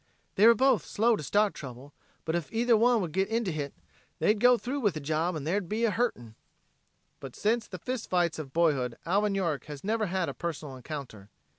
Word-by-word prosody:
"They 210 +4 +5
were 235 - +8
both 255 - +3
slow 230 +2 +2
to - - -5
start 205 +8 +2
trouble, 135 +1 -10 0.3
but 160 - -1
ef 170 -4 -3
either 235 +1 +3
one 235 +1 +4
would 175 -4 -3
git 190 +4 +1
into 225 -3 -1
hit, 145 -3 -4 0.5
they'd 210 0 +2
go 245 +2 +6
through 260 +5 -3
with 205 - +1
the - - -3
job 160 +4 -1
and 150 -2 -5
there'd 180 +2 -1
be 225 +2 0
a 225 - +2
hurtin'." 165 - -2 0.9
But 135 -3 -9
since 225 +1 0
the 185 - -7
fist 250 +6 -5
fights 175 -3 +1
of 140 -4 -7
boyhood 135 -7 +1
Alvin 200 +3 +1
York 170 -7 -1
has 145 -2 -9
never 215 +1 0
had 185 -1 -1
a - - -4
personal 155 -5 -5
encounter. 125 -7 -8
180 Hz, 210 wpm, -29 LUFS, 150-220 Hz, 0.9 s, were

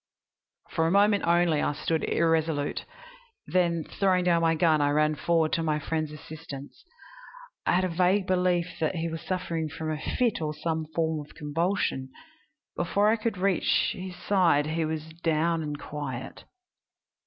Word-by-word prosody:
"For 160 - +1
a - - +1
moment 205 +1 +4
only 170 -3 +3
I - - 0
stood 160 +2 -1
irresolute, 160 -3 0 0.6
then, 170 -3 +1
throwing 185 0 +1
down 170 -1 +3
my 165 0 +3
gun, 160 -2 +3
I 145 - +3
ran 150 +1 +3
forward 160 +3 +1
to 165 - +1
my 155 -2 +1
friend's 155 0 -2
assistance. 150 -2 -10 0.8
I - - +4
had 185 - +3
a - - +2
vague 185 +3 +2
belief 180 -1 +1
that 160 +3 0
he 165 0 -2
was 165 0 -5
suffering 170 -4 -2
from 155 +1 -4
a 155 -1 -4
fit 240 -8 0
or 150 -1 -2
some 160 0 -2
form 160 -1 0
of 145 - -18
convulsion. 150 -3 -1 0.7
Before 200 +4 +2
I 220 - +4
could 225 -2 -2
reach 190 -1 +2
his 185 0 -7
side 170 -8 +2
he 160 +1 -1
was 155 0 -3 0.2
down 165 0 +1
and 150 -1 -4
quiet. 135 -4 -6
165 Hz, 165 wpm, -27 LUFS, 155-180 Hz, 0.8 s, moment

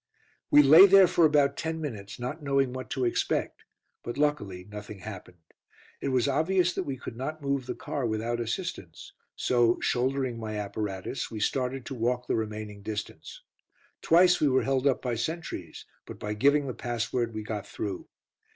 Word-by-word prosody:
We 145 - +7
lay 160 +8 +9
there 195 0 +8
for 170 -1 +3
about 145 -2 +3
ten 160 0 -3
minutes, 110 -10 -6
not 125 +7 -5
knowing 140 -3 +1
what 130 -4 -6
to 130 - -1
expect, 120 - -1 0.4
but 120 - -6
luckily 120 -12 -1
nothing 105 -1 -9
happened. 90 -5 -10 0.6
It - - -2
was 130 -1 +2
obvious 175 +6 +2
that - - -3
we 135 -2 -4
could 120 - -8
not 150 +5 -5
move 140 -2 -1
the - - -3
car 140 -5 -3
without 115 +2 -2
assistance, 115 - -5 0.2
so 120 -1 +2
shouldering 130 -1 0
my 110 -1 -4
apparatus 100 +1 -4
we 110 - -6
started 130 +3 -1
to - - -6
walk 125 +1 -1
the - - -1
remaining 105 -2 -4
distance. 105 +1 -7 0.6
Twice 175 +2 +5
we 150 - +4
were 130 -1 +3
held 135 0 +1
up 135 - +1
by 125 -2 -1
sentries, 120 - -5 0.2
but - - -8
by 105 0 -4
giving 140 +6 +3
the 130 - -4
password 120 0 -2
we 110 - -4
got 105 -1 -5
through. 100 -3 -5
125 Hz, 175 wpm, -28 LUFS, 110-140 Hz, 0.6 s, lay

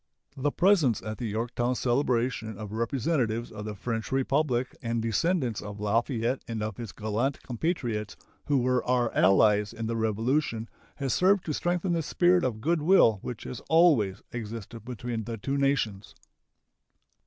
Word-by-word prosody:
The 145 +1 0
presence 170 - +3
at 110 0 -5
the 120 - -2
Yorktown 120 +3 -1
celebration 120 -4 0
of 105 -1 -7
representatives 115 0 -1
of 105 -1 -7
the 105 -1 -5
French 115 +1 -4
Republic 135 -1 0
and 115 -2 -1
descendants 120 - 0
of 105 -1 -8
Lafayette 115 +4 0
and 115 -2 -3
of 110 -2 -4
his 115 -4 -6
gallant 110 +7 -2
compatriots 120 - -2 0.3
who 145 - +2
were 125 0 +1
our 125 -2 +1
allies 105 +3 +4
in 115 - -5
the 115 +1 -2
Revolution 115 +2 0 0.3
has 135 -3 -1
served 190 +1 +3
to 155 - -2
strengthen 175 +3 0
the 165 - +1
spirit 175 +3 +3
of 110 -4 -2
good 165 +4 +1
will 150 - +5
which 120 -3 -6
has 125 - -6
always 145 - +4
existed 115 -1 -7
between 120 -2 -4
the 115 0 -4
two 135 +7 -2
nations. 125 -8 0
120 Hz, 155 wpm, -28 LUFS, 110-140 Hz, 0.3 s, will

